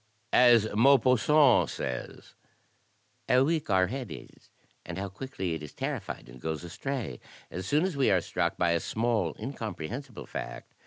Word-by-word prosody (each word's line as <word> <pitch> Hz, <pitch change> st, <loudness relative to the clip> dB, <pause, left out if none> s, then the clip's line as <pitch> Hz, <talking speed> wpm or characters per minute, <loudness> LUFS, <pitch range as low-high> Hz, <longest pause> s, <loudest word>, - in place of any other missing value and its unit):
As 120 Hz, -3 st, +6 dB
Maupassant 130 Hz, +3 st, +5 dB
says, 65 Hz, -1 st, -6 dB, 1.0 s
"How 125 Hz, +1 st, +5 dB
weak 155 Hz, -1 st, 0 dB
our 95 Hz, -2 st, +4 dB
head 130 Hz, +5 st, -4 dB
is, -, -, -12 dB, 0.3 s
and 85 Hz, +1 st, -7 dB
how 100 Hz, +1 st, -3 dB
quickly 95 Hz, -5 st, -4 dB
it 80 Hz, -, -4 dB
is 75 Hz, -, -9 dB
terriiSed -, -, -4 dB
and -, -, -13 dB
goes 80 Hz, +1 st, -3 dB
astray, 110 Hz, -, -4 dB, 0.3 s
as 95 Hz, +1 st, -5 dB
soon 150 Hz, -, +3 dB
as 185 Hz, -4 st, -1 dB
we 140 Hz, -2 st, +3 dB
are 95 Hz, -, +4 dB
struck 85 Hz, 0 st, -2 dB
by 85 Hz, -1 st, +2 dB
a 85 Hz, -, +2 dB
small 115 Hz, +5 st, -1 dB
incomprehensible 120 Hz, -, -6 dB
fact. -, -, -7 dB
110 Hz, 155 wpm, -29 LUFS, 85-135 Hz, 1.0 s, As